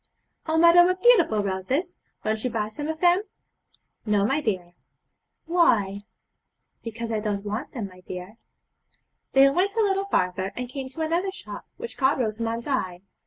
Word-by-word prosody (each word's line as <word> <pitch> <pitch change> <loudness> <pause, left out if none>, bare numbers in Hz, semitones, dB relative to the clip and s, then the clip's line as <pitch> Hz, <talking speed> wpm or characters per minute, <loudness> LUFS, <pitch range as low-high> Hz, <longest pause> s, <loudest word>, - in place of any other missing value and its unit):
'Oh 320 0 +1
mother, 340 +1 +7
what 365 +1 +1
beautiful 345 - +5
roses! 255 - -2 0.3
Won't 215 0 -1
you 250 - 0
buy 215 -3 -2
some 290 +7 -5
of 315 0 -4
them?' 355 +1 +5 0.8
'No, 205 -2 +2
my 275 +7 +1
dear.' 185 -8 -2 0.7
'Why?' 210 - +2 0.8
'Because 230 0 -5
I 220 - 0
don't 210 -1 -3
want 215 +7 -4
them, 235 -7 -4
my 185 -1 -16
dear.' 180 +4 -8 1.0
They 270 +1 +7
went 385 +7 0
a 450 - +3
little 390 -1 +1
farther, 185 - -1
and 250 0 -4
came 265 0 -6
to 275 +5 -7
another 340 +5 0
shop, - - -9
which 475 - -7
caught 265 +1 +3
Rosamond's 230 -1 -2
eye. 185 -11 -2
245 Hz, 165 wpm, -25 LUFS, 210-335 Hz, 1.0 s, mother